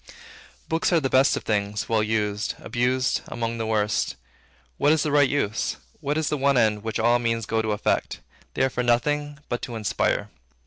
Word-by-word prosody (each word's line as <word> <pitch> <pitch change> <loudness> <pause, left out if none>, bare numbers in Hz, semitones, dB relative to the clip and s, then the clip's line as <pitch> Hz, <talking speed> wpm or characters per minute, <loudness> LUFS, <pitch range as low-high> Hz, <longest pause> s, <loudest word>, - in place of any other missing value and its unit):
Books 165 +3 0
are 170 - +4
the 135 -4 -2
best 130 +1 +4
of - - -5
things, 105 -1 -1
well 110 -1 +2
used; 105 -1 -1
abused, 125 +1 0
among 115 0 -3
the 110 - -2
worst. 105 -1 0 0.6
What 145 - +4
is 155 -2 +3
the 150 - -1
right 145 -2 +4
use? 110 -7 -1 0.2
What 150 0 -1
is 160 -1 0
the 150 - 0
one 140 0 +2
end, 110 -3 +2
which 110 0 -3
all 120 +2 +3
means 115 -2 -1
go 110 +2 0
to 110 -1 -2
effect? 105 - -1 0.4
They - - +1
are 130 - +2
for 125 - -1
nothing 145 +5 0
but 120 - -3
to 120 - -6
inspire. 110 -2 -1
120 Hz, 195 wpm, -24 LUFS, 110-140 Hz, 0.6 s, are